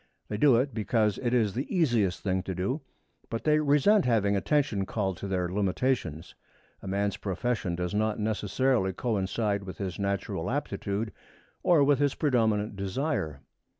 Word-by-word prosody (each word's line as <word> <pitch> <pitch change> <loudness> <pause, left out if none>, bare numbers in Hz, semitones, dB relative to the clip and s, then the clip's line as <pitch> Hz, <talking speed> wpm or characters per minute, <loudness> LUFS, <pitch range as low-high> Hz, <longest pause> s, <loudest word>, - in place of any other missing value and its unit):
They 105 - -2
do 135 +2 +5
it 130 +4 +1
because 110 -1 +1
it 120 -2 -1
is 110 -5 +2
the 130 +5 -4
easiest 120 - +1
thing 95 -1 0
to 95 - -2
do, 100 - -2 0.5
but 115 - -3
they 150 0 +4
resent 155 +8 +4
having 105 -4 +2
attention 110 -3 +1
called 95 -5 -2
to 100 - -5
their 90 -2 0
limitations. 95 - -1 0.5
A - - -9
man's 100 +1 -1
profession 95 -1 -2
does 90 +2 -3
not 110 +1 +1
necessarily 105 0 +1
coincide 100 -1 -1
with 95 -2 -8
his 95 -2 -4
natural 100 -1 -2
aptitude 105 +2 -2 0.5
or 165 -5 +4
with 140 -1 +3
his 145 -1 +2
predominant 110 -6 +1
desire. 95 - -2
105 Hz, 155 wpm, -28 LUFS, 95-130 Hz, 0.5 s, do